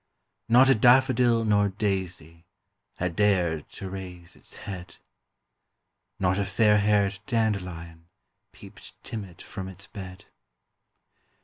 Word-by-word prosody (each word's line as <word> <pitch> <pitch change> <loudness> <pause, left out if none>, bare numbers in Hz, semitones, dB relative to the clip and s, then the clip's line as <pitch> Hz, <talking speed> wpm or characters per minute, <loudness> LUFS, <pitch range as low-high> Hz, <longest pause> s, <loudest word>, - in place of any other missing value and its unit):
Not 125 +3 +6
a 135 - +6
daffodil 120 -1 +4
nor 105 -1 +3
daisy 95 -5 -4 0.5
Had 90 -2 -3
dared 90 -7 +1
to 95 - -7
raise 90 -2 -9
its - - -14
head; 90 -3 -8 1.2
Not 95 +1 +1
a - - +1
fairhaired 105 -1 +2
dandelion 90 -7 -2 0.4
Peeped - - -14
timid 100 -7 -8
from 95 -1 -7
its 95 +1 -9
bed; 95 -2 -10
THE - - -20
CROCUSES. - - -33
95 Hz, 115 wpm, -26 LUFS, 90-105 Hz, 1.2 s, Not